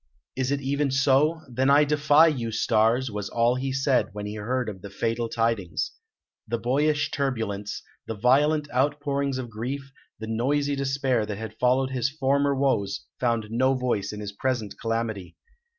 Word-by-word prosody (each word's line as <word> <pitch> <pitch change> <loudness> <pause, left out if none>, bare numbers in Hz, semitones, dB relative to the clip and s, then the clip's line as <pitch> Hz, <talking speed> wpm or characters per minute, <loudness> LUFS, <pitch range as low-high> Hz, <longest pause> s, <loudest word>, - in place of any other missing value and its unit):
"Is 130 -1 -1
it 140 0 0
even 140 +1 0
so? 140 +4 +3
Then 130 +2 0
I 145 +2 +6
defy 150 +1 +5
you, 125 -8 0
stars!" 115 +3 +2
was 105 -1 -4
all 120 +1 +2
he 130 +1 -2
said, 135 -1 +1
when 105 0 -5
he 105 - -5
heard 110 -2 -3
the 100 - -8
fatal 115 +3 -2
tidings. 115 -9 -1 0.6
The 115 - -1
boyish 145 +6 +1
turbulence, 110 -7 -2 0.2
the 115 - -3
violent 145 +7 +3
outpourings 140 0 0
of 125 -3 -5
grief, 135 +6 -5 0.3
the 110 - -5
noisy 140 +6 0
despair 135 -4 0
that 105 -2 -4
had 110 +1 -8
followed 130 +1 +2
his 130 -1 0
former 140 -1 +1
woes 130 -8 0
found 115 -3 0
no 130 +3 +2
voice 120 -6 -1
in 105 0 -7
his 100 -1 -5
present 115 0 -2
calamity. 115 -4 -3
125 Hz, 165 wpm, -26 LUFS, 110-140 Hz, 0.6 s, I